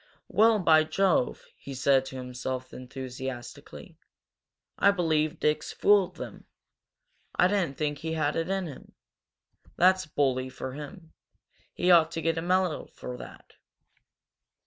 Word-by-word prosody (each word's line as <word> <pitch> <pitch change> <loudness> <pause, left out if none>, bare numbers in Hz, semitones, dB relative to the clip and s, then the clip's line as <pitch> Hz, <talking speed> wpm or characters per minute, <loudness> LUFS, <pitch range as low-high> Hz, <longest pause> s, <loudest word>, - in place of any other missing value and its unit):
"Well, 220 +1 +5
by 160 -5 +5
Jove!" 160 -3 +1
he 140 - -9
said 135 0 +3
to 135 - -8
himself, 130 0 -5
enthusiastically, 130 -1 -8 0.8
"I 200 - +6
believe 160 -4 +1
Dick's 150 0 0
fooled 200 -3 +3
them. - - -9 0.9
I 180 - +5
didn't 185 -8 -1
think 150 -2 -2
he 160 +1 -4
had 155 -2 0
it 165 +2 -2
in 195 -1 -1
him! 145 -6 -11 0.8
That's 185 -1 +4
bully 130 -3 0
for 130 0 -7
him! 160 +4 -10 0.6
He 180 +1 +2
ought 165 -2 +6
to 165 - -3
get 165 0 +1
a - - -3
medal 180 -1 0
for 125 - -8
that!" - - -12
155 Hz, 135 wpm, -28 LUFS, 130-180 Hz, 0.9 s, I